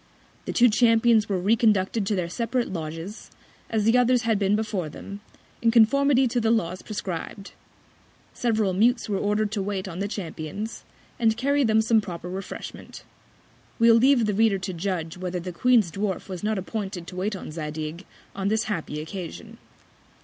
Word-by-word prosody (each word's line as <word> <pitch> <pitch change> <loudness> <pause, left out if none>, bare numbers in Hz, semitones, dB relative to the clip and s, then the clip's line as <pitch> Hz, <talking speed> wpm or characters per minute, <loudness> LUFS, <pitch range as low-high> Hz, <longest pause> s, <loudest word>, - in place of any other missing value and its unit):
The - - -3
two 245 - +5
Champions 225 -1 +4
were 195 - +1
reconducted 210 0 +2
to 210 - +1
their 180 -3 -1
separate 235 +5 -2
Lodges, 165 +5 -6 0.4
as 220 -2 0
the 225 +4 +4
others 250 0 +3
had 225 -3 +1
been 200 0 +2
before 210 -7 -2
them, 200 +6 -9 0.4
in 230 - +3
Conformity 260 +4 +4
to 240 +1 0
the 225 - +1
Laws 185 -6 0
prescrib'd. 195 -1 -6 0.8
Several 220 -5 0
Mutes 230 +5 +2
were 200 -2 -1
order'd 210 +1 0
to 210 -2 -1
wait 195 -1 -3
on 180 -1 -6
the 200 - -1
Champions, 200 +1 -6 0.4
and 225 -2 +2
carry 280 +2 +2
them 220 -2 +3
some 220 0 +3
proper 180 -2 -7
Refreshment. 190 +1 -8 0.7
We'll 230 -1 +6
leave 240 +1 +5
the 210 - 0
Reader 215 -1 +3
to 190 0 -5
judge 175 -2 -3
whether 180 -1 -3
the 180 +1 -6
Queen's 225 -2 +3
Dwarf 195 +1 -3
was 185 -1 -7
not 215 0 0
appointed 190 -2 -4
to 180 - -10
wait 195 +3 -2
on 185 - -7
Zadig 155 +2 -5 0.3
on 195 0 -2
this 220 +1 +1
happy 160 -7 -3
Occasion. 195 +7 -8
205 Hz, 170 wpm, -25 LUFS, 185-225 Hz, 0.8 s, We'll